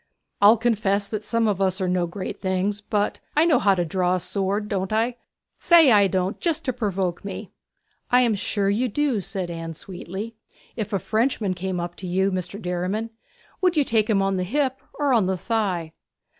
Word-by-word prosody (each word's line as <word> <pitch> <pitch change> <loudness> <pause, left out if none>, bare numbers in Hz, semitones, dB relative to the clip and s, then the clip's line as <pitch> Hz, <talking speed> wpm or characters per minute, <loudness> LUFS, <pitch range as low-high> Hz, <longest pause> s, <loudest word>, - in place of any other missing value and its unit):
I'll 210 +3 +7
confess 205 -3 +1
that 215 -2 -3
some 230 +1 0
of 200 -2 0
us 190 0 +1
are 185 - 0
no 180 -1 +1
great 185 +2 -6
things: 190 +2 -1
but 210 0 -1 0.2
I 310 - +6
know 335 - +4
how 195 -1 +4
to 175 -1 0
draw 180 +2 +1
a - - -1
sword, 200 +3 -2
don't 195 -2 -2
I? 230 +3 0 0.4
say 330 -6 +6
I 205 -2 +6
don't 190 +2 -1
just 330 -2 -1
to 255 - 0
provoke 195 -7 -2
me.' 200 - -7 0.6
'I 250 +1 +5
am 235 -3 +3
sure 200 0 -1
you 215 +6 +1
do,' 260 -2 0
said 185 -2 -4
Anne 165 -1 -6
sweetly. 190 +5 -7 0.4
'If 215 -3 -4
a 200 - +1
Frenchman 220 -1 0
came 185 0 -3
up 175 0 -4
to 185 - -7
you, 190 +2 +1
Mr. 185 +2 -3
Derriman, 185 +5 -2 0.5
would 360 -3 +2
you 295 - +5
take 225 -4 +1
him 195 -3 +3
on 195 -1 0
the 185 - 0
hip, 265 +6 0 0.2
or 285 -3 +2
on 220 -6 +3
the 190 0 0
thigh?' 185 -7 -1
200 Hz, 200 wpm, -24 LUFS, 185-225 Hz, 0.6 s, I'll